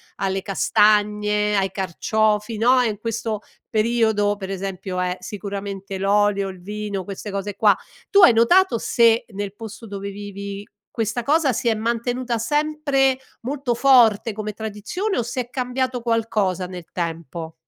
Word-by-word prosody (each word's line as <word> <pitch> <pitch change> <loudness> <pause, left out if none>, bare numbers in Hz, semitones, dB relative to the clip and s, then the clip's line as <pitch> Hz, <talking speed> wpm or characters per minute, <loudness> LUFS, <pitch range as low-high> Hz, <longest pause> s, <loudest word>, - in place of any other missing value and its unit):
alle 195 0 -1
castagne, 210 +1 +2
ai 195 0 +1
carciofi, 210 +4 0
no, 250 +4 +4
e 240 - +2
in 210 - -4
questo 225 -1 -3 0.3
periodo, 220 -2 +2
per 195 -2 -7
esempio, 190 -1 -4
è 180 0 0
sicuramente 195 0 -6
l'olio, 200 0 +2
il 185 -1 -9
vino, 205 +1 -4
queste 200 +2 -7
cose 200 0 -4
qua; 205 -2 +4 0.3
tu 400 -1 +5
hai 360 - +8
notato 235 +5 +4
se 230 0 +3
nel 200 0 -4
posto 220 +1 -9
dove 200 -1 -6
vivi 200 0 -7 0.3
questa 225 +2 -2
cosa 290 0 +2
si 235 +1 0
è - - +3
mantenuta 235 +2 -1
sempre 285 +1 +1 0.3
molto 260 -1 -2
forte 235 -4 +5
come 215 0 -4
tradizione 220 - -3
o - - +1
se 245 +3 -3
è 240 - -20
cambiato 255 0 -2
qualcosa 215 -6 0
nel 180 -1 -8
tempo? 165 -1 -5
210 Hz, 150 wpm, -22 LUFS, 200-235 Hz, 0.3 s, hai